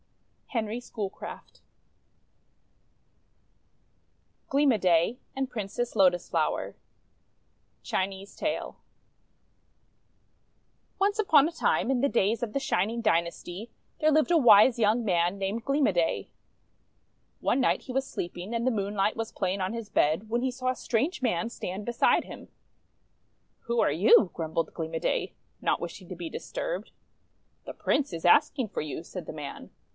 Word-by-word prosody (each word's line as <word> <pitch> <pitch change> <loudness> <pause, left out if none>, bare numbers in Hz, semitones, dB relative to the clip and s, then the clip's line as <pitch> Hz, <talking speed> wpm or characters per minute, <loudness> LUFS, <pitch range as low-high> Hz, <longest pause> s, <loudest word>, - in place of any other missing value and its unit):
HENRY 230 -1 -3
SCHOOLCRAFT 210 -5 -7 2.9
GLEAM 280 0 +4
O' - - +1
DAY 180 +5 +2
AND 270 -1 -2
PRINCESS 230 +1 -4
LOTUS 185 -3 +3
FLOWER - - -1 1.1
Chinese 195 +1 -3
Tale - - -3 2.2
ONCE 405 +2 +1
upon 310 -8 +5
a - - -4
time, 320 - +1
in 260 -2 +1
the 280 - +3
days 225 0 +1
of 230 - -2
the 275 - -1
Shining 220 -1 0
Dynasty, 175 0 -1 0.3
there 310 0 +3
lived 310 +3 +3
a 340 - +6
wise 240 -3 +7
young 225 +1 +2
man 175 -1 +1
named 200 +4 -3
Gleam 275 +1 +2
o' - - +3
Day. 170 -2 0 1.1
One 265 - +1
night - - +1
he 255 - -7
was 270 +1 0
sleeping, 175 -1 -6
and 235 +1 -1
the - - +4
moonlight 205 -1 0
was 225 -1 -4
playing 190 0 -2
on 185 - -1
his 230 -2 -5
bed, 165 +8 +1
when 235 +2 0
he 260 0 0
saw 255 0 -2
a 255 - 0
strange 275 +12 -1
man 230 -3 0
stand 195 -2 -6
beside 240 -1 +2
him. - - -11 1.2
"Who 235 0 0
are - - +3
you?' 185 +3 +5
grumbled 165 0 -2
Gleam 160 -1 -5
o' - - -1
Day, - - -1 0.3
not - - +1
wishing 175 +1 -8
to 185 - -6
be 170 -1 -6
disturbed. - - -5 0.7
"The - - -7
Prince 285 -6 0
is 165 -1 -6
asking 260 - +4
for - - -3
you," 150 -2 -5
said - - -8
the - - -4
man. - - -8
220 Hz, 150 wpm, -28 LUFS, 185-255 Hz, 2.9 s, wise